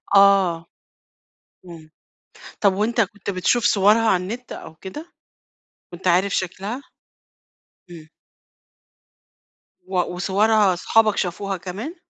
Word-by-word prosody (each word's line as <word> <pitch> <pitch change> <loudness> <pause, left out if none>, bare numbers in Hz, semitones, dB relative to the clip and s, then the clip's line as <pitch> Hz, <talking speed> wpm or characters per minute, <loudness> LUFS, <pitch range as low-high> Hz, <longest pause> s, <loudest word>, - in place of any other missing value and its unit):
آه، 195 -4 +4 1.0
إمم، 165 -3 -12 0.7
طب 200 -2 +4
وأنت 220 +4 0
كُنت 205 -1 -4
بتشوف 200 +5 +1
صورها 210 +3 +4
على 180 -3 +1
النِّت 235 +7 -7
أو 160 - -9
كده؟ 295 - -10 0.8
كنت 180 +2 -5
عارف 185 +3 +2
شكلها؟ 195 +7 -4 1.1
إمم. 160 -2 -12 1.8
و - - -3
وصورها 195 +3 +2
صحابك 215 +4 +2
شافوها 195 +2 -2
كمان؟ 200 - -7
195 Hz, 100 wpm, -21 LUFS, 180-215 Hz, 1.8 s, آه